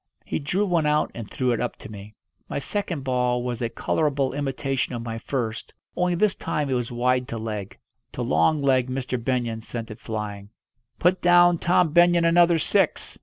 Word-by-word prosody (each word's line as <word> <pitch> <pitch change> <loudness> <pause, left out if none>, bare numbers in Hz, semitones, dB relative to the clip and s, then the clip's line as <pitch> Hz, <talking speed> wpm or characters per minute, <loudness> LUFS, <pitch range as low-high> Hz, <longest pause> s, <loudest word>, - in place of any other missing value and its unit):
He - - -2
drew 175 +8 0
one 170 -5 +1
out 150 0 +1
and 115 -3 -7
threw 130 -1 0
it 120 - 0
up - - -2
to - - -11
me. 105 +1 -11 0.3
My - - -3
second 170 0 -3
ball 125 -1 0
was 125 -1 -4
a 115 - -1
colourable 140 +2 0
imitation 135 -2 -2
of 115 - -5
my 115 -1 -5
first, 115 -3 -4 0.2
only 180 0 +1
this 205 +2 +2
time 145 -3 -3
it - - +2
was 125 -2 -2
wide 125 +1 +1
to 115 - -5
leg. 105 -3 -5 0.4
To - - -3
long 140 - +2
leg 130 -2 +2
Mr. 130 -2 -3
Benyon 120 -3 -1
sent 115 0 -6
it 110 - -9
flying. 105 -2 -5 0.5
"Put 180 +2 +2
down 175 -1 +5
Tom 175 -2 +2
Benyon 175 0 +5
another 170 0 +5
six!" 155 - 0
130 Hz, 190 wpm, -24 LUFS, 115-165 Hz, 0.5 s, down